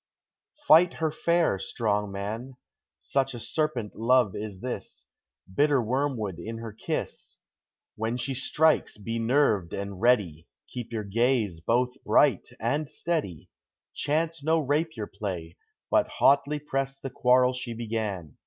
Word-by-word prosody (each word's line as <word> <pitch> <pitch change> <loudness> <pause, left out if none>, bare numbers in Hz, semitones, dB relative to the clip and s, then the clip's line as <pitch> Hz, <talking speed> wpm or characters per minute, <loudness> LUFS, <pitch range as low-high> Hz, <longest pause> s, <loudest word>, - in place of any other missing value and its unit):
Fight 170 +2 +7
her 160 -2 0
fair, 170 - +1
strong 105 0 -1
man! 110 +7 -5 0.4
Such 135 -2 -1
a - - -6
serpent 120 -2 -2
love 120 -2 +3
is 105 -3 -6
this, 125 - -6 0.5
Bitter 145 +3 +3
wormwood 120 - -1
in 115 +6 -6
her 115 -1 -7
kiss! 110 - -5 0.6
When 110 +2 -2
she 125 +2 -2
strikes, 150 +3 +2
be 115 +3 -4
nerved 115 - +2
and 100 -1 -5
ready; 100 - +2 0.3
Keep 120 -2 -6
your 110 -2 -3
gaze 110 -3 +1
both 125 +8 0
bright 135 -10 +3
and 145 +6 -1
steady, 155 - -3 0.4
Chance 160 +1 -1
no 160 +2 +3
rapier 150 -5 -1
play, 95 -5 -6 0.4
but - - +4
hotly 140 +2 +3
press 135 -2 -3
the 135 -1 -7
quarrel 125 0 +4
she 125 -2 -5
began! 110 - -4
120 Hz, 135 wpm, -27 LUFS, 105-140 Hz, 0.6 s, Fight